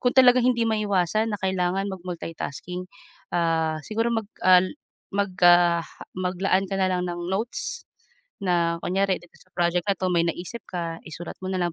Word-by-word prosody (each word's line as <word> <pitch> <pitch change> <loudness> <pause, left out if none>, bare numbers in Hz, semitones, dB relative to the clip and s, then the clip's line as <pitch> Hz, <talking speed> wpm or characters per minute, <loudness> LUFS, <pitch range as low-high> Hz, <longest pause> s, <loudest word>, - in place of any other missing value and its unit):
kung 245 - +2
talagang 250 -1 +7
hindi 235 -2 +3
maiwasan 215 0 +1
na 205 - -2
kailangan 190 +1 0
mag-multi 180 -3 -6
tasking, 180 +5 -5 0.5
ah, 160 -2 +1
siguro 225 +2 0
mag 225 -3 -2 0.2
al 185 0 +6 0.4
magka 175 -3 +4 0.4
mag-laan 185 +1 +1
ka 195 - -2
na 190 -1 +2
lang 180 0 -1
ng 175 +1 -4
notes, 235 - -3 0.6
na 170 -2 +2
kunyari 190 +1 +1
dito 175 - -19
sa 185 - -22
project 175 0 +1
na 200 - +4
'to 185 0 -1
may 170 - +3
naisip 180 +7 -4
ka, 170 -2 -4
isulat 165 +2 -7
mo 185 - -5
na 190 - -1
lang 175 -1 0
185 Hz, 170 wpm, -25 LUFS, 175-200 Hz, 0.6 s, talagang